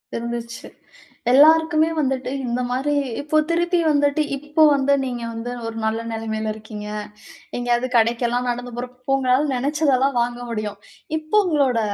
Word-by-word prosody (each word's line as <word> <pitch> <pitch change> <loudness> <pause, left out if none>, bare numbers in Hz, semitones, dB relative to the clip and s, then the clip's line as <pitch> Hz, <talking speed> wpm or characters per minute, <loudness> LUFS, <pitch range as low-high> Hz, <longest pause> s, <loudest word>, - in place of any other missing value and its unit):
இருந்துச்சு. 235 0 -5 0.6
எல்லாருக்குமே 315 +3 +5
வந்துட்டு 265 -1 -1
இந்த 245 +1 -1
மாரி 270 +4 0 0.3
இப்போ 305 +1 0
திருப்பி 345 +1 +1
வந்துட்டு 285 +1 +2 0.2
இப்ப 300 +2 +3
வந்து 280 0 +2
நீங்க 245 -2 -4
வந்து 230 +2 -5 0.2
ஒரு 225 - -6
நல்ல 220 +1 0
நெலமையில 220 -1 -3
இருக்கீங்க. 210 -1 -8 0.7
எங்கேயாவது 245 +1 0
கடைக்கெல்லாம் 240 +2 +1
நடந்து 245 0 -6
போறப்ப 250 0 -6
இப்ப 270 +1 +1
உங்களால 265 +3 +2
நெனச்சதெல்லாம் 275 -1 +1
வாங்க 240 0 -2
முடியும். 210 -2 -4 0.4
இப்போ 315 +7 0
உங்களோட 275 -8 +2
250 Hz, 135 wpm, -22 LUFS, 235-290 Hz, 0.7 s, எல்லாருக்குமே